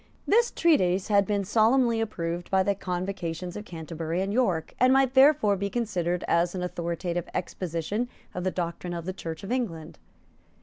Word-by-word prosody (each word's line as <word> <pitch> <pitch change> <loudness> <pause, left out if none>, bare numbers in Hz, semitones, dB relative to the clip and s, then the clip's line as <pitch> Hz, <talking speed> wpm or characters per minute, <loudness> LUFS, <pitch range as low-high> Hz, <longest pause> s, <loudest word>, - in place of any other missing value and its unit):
This 470 +3 +4
treatise 190 - +2
had 200 -2 +4
been 205 -1 0
solemnly 230 +3 +3
approved 175 -5 -3
by 190 -1 +3
the 200 - +2
Convocations 180 -2 -4
of 210 - -6
Canterbury 165 0 -4
and 195 +1 -2
York, 185 -10 0
and 255 +1 +5
might 265 -1 +4
therefore 265 -6 +5
be 200 +1 -2
considered 180 -7 -1
as 170 +2 +2
an 180 - -3
authoritative 175 0 -3
exposition 185 +6 -3 0.2
of 180 - -4
the 185 - +1
doctrine 175 0 -4
of 170 -1 -5
the 185 - -3
Church 165 -2 -7
of 195 - -6
England. 190 -12 -3
185 Hz, 170 wpm, -27 LUFS, 170-220 Hz, 0.2 s, and